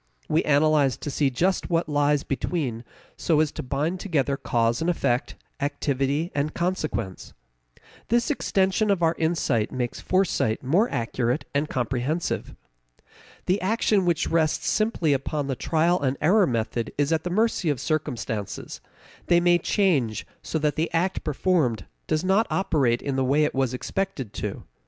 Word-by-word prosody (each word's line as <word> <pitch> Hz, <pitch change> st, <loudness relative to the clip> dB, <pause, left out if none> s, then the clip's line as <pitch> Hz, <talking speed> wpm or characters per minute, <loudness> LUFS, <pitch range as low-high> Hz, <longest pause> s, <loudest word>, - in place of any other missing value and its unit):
We 160 Hz, -, +2 dB
analyze 145 Hz, -2 st, +3 dB
to 145 Hz, -, -5 dB
see 140 Hz, 0 st, +1 dB
just 180 Hz, +9 st, 0 dB
what 170 Hz, -1 st, +1 dB
lies 145 Hz, -1 st, +2 dB
between 135 Hz, -5 st, -2 dB, 0.3 s
so 160 Hz, -3 st, +2 dB
as 155 Hz, -2 st, +2 dB
to -, -, -6 dB
bind 150 Hz, +8 st, -2 dB
together 145 Hz, -8 st, 0 dB
cause 115 Hz, -1 st, 0 dB
and 165 Hz, -, +1 dB
effect, 125 Hz, -6 st, 0 dB, 0.2 s
activity 145 Hz, +2 st, -1 dB
and 145 Hz, +1 st, -1 dB
consequence. 155 Hz, -, -3 dB, 0.7 s
This 235 Hz, +4 st, +2 dB
extension 195 Hz, -5 st, +1 dB
of 190 Hz, -4 st, +2 dB
our 165 Hz, 0 st, +4 dB
insight 160 Hz, -9 st, 0 dB
makes 125 Hz, -2 st, -3 dB
foresight 185 Hz, -, 0 dB
more 180 Hz, -, +2 dB
accurate 120 Hz, +3 st, -1 dB
and 145 Hz, +2 st, 0 dB
comprehensive. 130 Hz, +6 st, -2 dB, 0.9 s
The 185 Hz, +3 st, +1 dB
action 205 Hz, 0 st, +2 dB
which 170 Hz, -2 st, +1 dB
rests 160 Hz, -2 st, +1 dB
simply 215 Hz, -9 st, +1 dB
upon 140 Hz, +2 st, -2 dB
the 135 Hz, -1 st, -2 dB
trial 165 Hz, +5 st, +1 dB
and 135 Hz, -1 st, 0 dB
error 185 Hz, +5 st, +4 dB
method 115 Hz, -2 st, -2 dB
is 145 Hz, +2 st, +2 dB
at 160 Hz, -, 0 dB
the 180 Hz, -, -2 dB
mercy 205 Hz, -2 st, +1 dB
of 145 Hz, -4 st, 0 dB
circumstances; 120 Hz, -, -3 dB, 0.5 s
they 175 Hz, -, +5 dB
may 175 Hz, 0 st, +4 dB
change 150 Hz, -, +1 dB, 0.2 s
so -, -, -3 dB
that 150 Hz, -2 st, 0 dB
the 160 Hz, +2 st, 0 dB
act 185 Hz, +3 st, 0 dB
performed 145 Hz, -, 0 dB, 0.2 s
does 155 Hz, +2 st, 0 dB
not 195 Hz, +4 st, +3 dB
operate 145 Hz, -11 st, +1 dB
in 140 Hz, -2 st, -2 dB
the 135 Hz, -, +2 dB
way 140 Hz, +4 st, +3 dB
it 150 Hz, -, 0 dB
was 130 Hz, -2 st, 0 dB
expected 135 Hz, -, -3 dB
to. -, -, -5 dB
150 Hz, 155 wpm, -25 LUFS, 130-175 Hz, 0.9 s, they